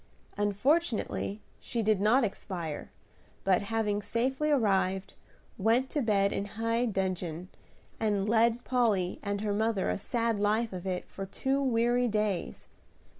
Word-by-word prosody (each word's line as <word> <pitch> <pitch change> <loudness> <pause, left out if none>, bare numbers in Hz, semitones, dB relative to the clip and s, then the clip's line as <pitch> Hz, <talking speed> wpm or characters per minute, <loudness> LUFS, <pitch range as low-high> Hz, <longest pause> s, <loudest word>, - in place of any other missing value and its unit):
Unfortunately 210 - 0 0.2
she 235 -2 -2
did 215 -2 +2
not 235 +6 +4
expire, 175 -7 -4 0.5
but, 190 -1 +3
having 210 0 -1
safely 265 +8 0
arrived, 195 -8 +1 0.5
went 230 +6 +2
to 295 - 0
bed 200 -4 +2
in 200 - -2
high 230 +3 -1
dudgeon, 185 -4 -2 0.5
and 205 -2 +1
led 230 +2 +3
Polly 215 -8 +1
and 200 -1 -2
her 210 -1 0
mother 215 - +1
a 90 - -2
sad 230 -3 -1
life 215 +2 +1
of 185 +1 -5
it 180 -1 -3
for 195 0 -7
two 265 +8 -1
weary 245 -1 +2
days. 210 - -2
215 Hz, 135 wpm, -30 LUFS, 195-235 Hz, 0.5 s, not